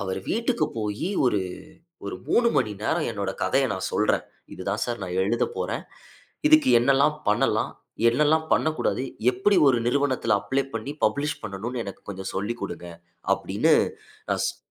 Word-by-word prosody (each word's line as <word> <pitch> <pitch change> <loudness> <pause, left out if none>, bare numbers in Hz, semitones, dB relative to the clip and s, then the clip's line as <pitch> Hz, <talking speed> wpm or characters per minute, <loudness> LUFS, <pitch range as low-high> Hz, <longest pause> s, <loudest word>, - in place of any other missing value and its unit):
அவரு 95 -1 -3
வீட்டுக்கு 235 +2 +1
போய் 105 +7 -2 1.0
ஒரு - - -4
3 235 0 +4
மணி 105 - +2
நேரம் 160 +4 0
என்னுடைய 100 -3 -3
கதைய - - +2
நான் - - -3
சொல்றேன். - - +1 0.3
"இதுதான் 100 +3 -3
சார் 120 -1 -4
நான் 90 0 -3
எழுதப் 115 +4 0
போறேன். - - -2 0.7
இதுக்கு 310 0 +6
என்னெல்லாம் 140 +4 +3
பண்ணலாம்? 105 - +2 0.4
என்னெல்லாம் 150 +6 +3
பண்ணக்கூடாது? 155 -4 +1 0.3
எப்படி 160 +12 +2
ஒரு 125 -3 +3
நிறுவனத்தில 130 -4 +2
அப்ளை 135 +1 0
பண்ணி 115 +5 -3
பப்ளிஷ் 140 +8 +1
பண்ணனும்ன்னு 110 +4 -4
எனக்கு 100 - -8
கொஞ்சம் 95 -1 -5
சொல்லிக் 105 +5 -3
கொடுங்க" 90 - -5 0.5
அப்பிடின்னு. - - +2 0.6
நான் - - +1
சொன் - - -6
120 Hz, 145 wpm, -25 LUFS, 105-150 Hz, 1.0 s, இதுக்கு